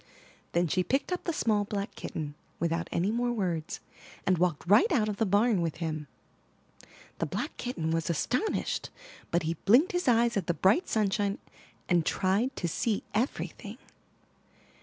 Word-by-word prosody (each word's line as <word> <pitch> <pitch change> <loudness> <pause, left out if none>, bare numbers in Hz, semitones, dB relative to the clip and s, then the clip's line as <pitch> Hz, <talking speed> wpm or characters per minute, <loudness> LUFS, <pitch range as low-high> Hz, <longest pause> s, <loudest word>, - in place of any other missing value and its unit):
'' - - -29
Then 175 0 +2
she 185 +4 +1
picked 270 - 0
up 360 - -2
the 340 - +1
small 215 -9 +1
black 200 -1 -4
kitten, 150 -2 -5 0.3
without 170 0 -1
any 185 +5 +1
more 240 +1 0
words 175 -8 -2 0.5
and 185 -3 +2
walked 175 -4 +1
right 280 - +5
out 225 -8 +3
of 210 -1 -2
the 225 - +1
barn 205 0 +3
with 165 -2 -1
him. 155 -3 -4 1.1
The - - 0
black - - -3
kitten 165 -11 -2
was 165 0 0
astonished, 250 - -1 0.4
but 170 0 +1
he 160 +1 0
blinked 250 - +6
his 355 -3 -1
eyes 235 -1 +4
at 190 - -2
the 170 - +1
bright 205 - +3
sunshine, 205 -1 +1 0.5
and 175 -2 +3
tried 205 - +1
to 175 - -2
see 210 +6 -1
everything. 235 +5 -2
200 Hz, 165 wpm, -29 LUFS, 170-235 Hz, 1.1 s, blinked